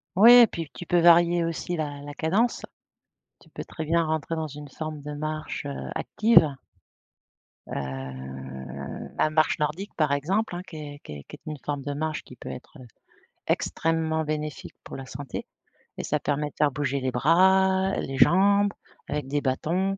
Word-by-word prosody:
Oui 220 +6 +9
et 245 -1 +10
puis, 165 -6 -6
tu 175 - -7
peux 175 +1 +3
varier 170 0 +6
aussi 165 +1 -2
la 145 -3 -3
la 145 0 -8
cadence. 195 +11 +1 0.8
Tu - - -20
peux - - -7
très 160 - -6
bien 170 +1 +2
rentrer 160 +1 -1
dans 160 -1 -2
une 145 0 -9
forme 155 +1 -6
de 150 +1 -6
marche, 155 0 -4
heu, 140 -1 -5
active. 210 -10 +4 1.1
Heu, 65 0 -6
la - - +3
marche 155 0 +2
nordique, 160 +7 -2
par 155 -3 +1
exemple, 180 +8 0
hein, 175 - -4
qui 170 - -10
est 145 -1 -8
qui 75 - -8
est 70 - -9
qui - - -11
est - - -17
une 150 - -5
forme 145 -1 -2
de 145 +1 -4
marche 155 +1 -3
qui 125 - -13
peut - - -9
être, 130 - -10
heu, 125 - -12 0.6
extrêmement 160 -1 0
bénéfique 150 -1 -4
pour - - -8
la 135 -1 -8
santé 140 -1 -6 0.5
et - - -4
ça 150 - 0
permet 145 +1 -1
de - - -44
faire 150 -1 +3
bouger 140 0 -1
les 130 0 -1
bras, 190 +7 +4
les 135 - -3
jambes, 200 +5 +5 0.4
avec 145 -2 -2
des 145 +1 0
bâtons. 175 +9 0
155 Hz, 185 wpm, -26 LUFS, 140-170 Hz, 1.1 s, et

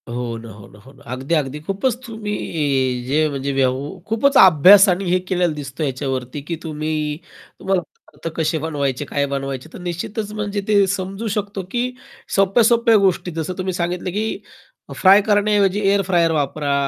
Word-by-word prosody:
हो 120 -1 -4
ना. 115 0 -10
हो 105 -1 -13
ना, 105 - -17
हो 130 +6 -16
ना. - - -19
अगदी, 135 +6 -1
अगदी. 145 -1 -2
खूपच 195 - -1
तुम्ही 150 - -2
जे 155 +3 +2
म्हणजे 140 -1 -3
व्यव् 135 +6 -1
खूपच 265 +6 +2
अभ्यास 190 +4 +8
आणि 185 +2 0
हे 185 - +3
केलेला 180 -3 +1
दिसतो 145 +1 -6
याच्यावरती 130 0 -3
की 170 - -2
तुम्ही 155 -1 -3 0.4
तुम्हाला 190 -2 0
पदार्थ 165 - -13
कसे 160 0 0
बनवायचे, 145 -3 -2
काय 140 0 -1
बनवायचे. 135 0 -4
तर - - -9
निश्चितच 180 +5 -4
म्हणजे 205 -1 -3
ते 205 -2 +4
समजू 195 +3 -3
शकतो 200 -1 -3
की 245 +1 0 0.5
सोप्या-सोप्या 230 +4 +4
गोष्टी 190 -2 +1
जसं 165 +2 -4
तुम्ही 185 0 -2
सांगितलं 175 +1 -2
की 215 +4 -3 0.5
फ्राय 195 +2 +6
करण्याऐवजी 205 -1 +2
एअर 200 0 +3
फ्रायर 170 -3 +2
वापरा, 145 -1 -1
170 Hz, 165 wpm, -20 LUFS, 140-200 Hz, 0.5 s, अभ्यास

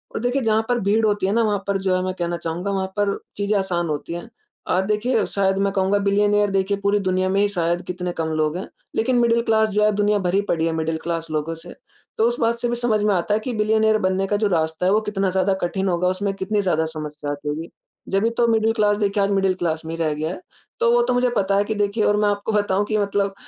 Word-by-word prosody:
और - - -1
देखिए 245 +3 0
जहाँ 220 0 +2
पर 245 0 +2
भीड़ 215 +3 +2
होती 205 -2 +1
है 195 - 0
ना 230 - +3
वहाँ 205 -3 0
पर 200 -1 +1
जो 190 -1 +1
है 185 - 0
मैं 185 0 -2
कहना 175 0 -1
चाहूँगा 170 +4 -3
वहाँ 190 -1 -1
पर 205 -1 +1 0.2
चीज़ें 205 +1 +1
आसान 175 -3 -1
होती 150 +3 -4
हैं। 175 +6 -7 0.4
आप 185 - +2
देखिए 220 +3 +1
शायद 195 -1 0
मैं 195 0 +1
कहूँगा 195 +1 +2
बिलियनेयर 205 +1 +2
देखिए 195 +1 0
पूरी 200 +1 +2
दुनिया 185 -1 0
में 195 +1 +1
ही 205 - +3
शायद 175 -2 0
कितने 180 0 -3
कम 160 -1 -2
लोग 155 +2 0
हैं। 185 - -6 0.3
लेकिन 245 +3 +1
मिडल 235 0 +3
क्लास 220 -1 +2
जो 210 0 +1
है 215 - +4
दुनिया 205 0 +2
भरी 190 +3 +2
पड़ी 165 -1 +1
है - - 0
मिडल 160 0 -1
क्लास 165 -1 -3
लोगों 155 +2 -2
से। 170 +2 -11 0.4
तो 225 - +3
उस 240 - -3
बात 230 +1 +1
से 240 - -1
भी 240 - 0
समझ 235 -3 +1
में 210 -1 +3
आता 180 +3 0
है - - +1
कि 255 - -4
बिलियनेयर 220 0 +3
बनने 190 +1 0
का 205 - +1
जो 210 - +1
रास्ता 160 -1 0
है 190 - +3
वो 215 - +3
कितना 200 -3 -1
ज़्यादा 190 +1 +1
कठिन 190 +2 -1
होगा, 180 0 +1
उसमें 195 +2 -1
कितनी 205 +2 -1
ज़्यादा 160 -5 +1
समस्या 150 -2 -5
आती 145 +1 -5
होगी। 160 +3 -4 0.4
जब 195 +2 +1
ही - - +3
तो 240 - +3
मिडल 225 -1 +2
क्लास 210 -2 +2
देखिए 200 -1 +1
आज 195 - +1
मिडल 195 -1 +2
क्लास 165 -3 -2
में 160 - -5
ही - - -8
रह 155 -1 0
गया 155 +2 -3
है। 185 - -8 0.4
तो 235 - +3
वो 240 - +4
तो 250 +1 0
मुझे 245 0 +2
पता 195 0 +1
है 200 - +3
कि 220 - -2
देखिए 205 +1 0
और 205 - +3
मैं 210 0 +2
आपको 205 +2 -2
बताऊँ 205 -1 +1
कि 215 +1 -1
मतलब 200 -1 0
200 Hz, 270 wpm, -22 LUFS, 180-210 Hz, 0.4 s, है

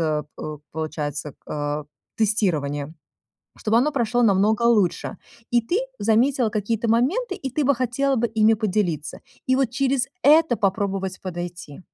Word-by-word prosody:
э, 155 -2 0
п 155 -1 -6
получается, 150 -2 -4 0.2
э, 145 0 -2 0.3
тестирование. 160 -9 0 0.6
Чтобы 220 +1 +2
оно 280 +5 +2
прошло 245 -2 +1
намного 210 +1 +3
лучше. 215 -7 +2 0.3
И 240 - +4
ты 235 +11 -1 0.2
заметила 240 +1 +2
какие-то 215 +2 -1
моменты, 325 - +1
и 270 -6 -5
ты 290 +4 -1
бы 280 +1 +4
хотела 255 +3 0
бы 235 0 +1
ими 220 0 +4
поделиться. 185 -8 -1 0.3
И 260 - +4
вот 265 -3 +1
через 270 0 +1 0.2
это 300 -4 +5
попробовать 195 -1 -1
подойти. 175 -4 -7
220 Hz, 140 wpm, -23 LUFS, 175-245 Hz, 0.6 s, это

